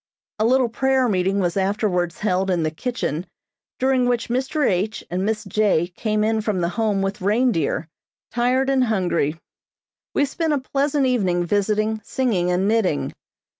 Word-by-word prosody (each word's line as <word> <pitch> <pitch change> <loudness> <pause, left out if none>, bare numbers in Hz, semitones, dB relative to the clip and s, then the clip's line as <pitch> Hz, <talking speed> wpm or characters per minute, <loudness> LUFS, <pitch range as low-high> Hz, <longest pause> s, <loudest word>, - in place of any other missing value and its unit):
A 215 - +2
little 255 +1 +3
prayer 265 +2 +1
meeting 190 -1 +1
was 175 -2 0
afterwards 190 -3 0
held 190 -2 0
in 175 -3 +1
the 155 - 0
kitchen 180 - -3 0.5
during 260 -1 +2
which 240 -1 0
Mr. 265 +4 0
H. 200 +4 -1
and 180 +1 -1
Miss 215 +1 -1
J. 195 -4 +1
came 210 +3 -1
in 220 0 +1
from 210 -3 -1
the 170 -1 0
Home 205 0 0
with 195 +1 -3
reindeer, 200 - +1 0.4
tired 255 +3 +1
and 260 -2 +3
hungry. 175 -8 0 0.8
We 285 - +3
spent 315 +2 -1
a - - +2
pleasant 280 +1 0
evening 185 -9 +1
visiting, 215 +3 0
singing 210 -9 0
and 180 +2 +1
knitting. 210 -9 +1
215 Hz, 160 wpm, -22 LUFS, 180-250 Hz, 0.8 s, little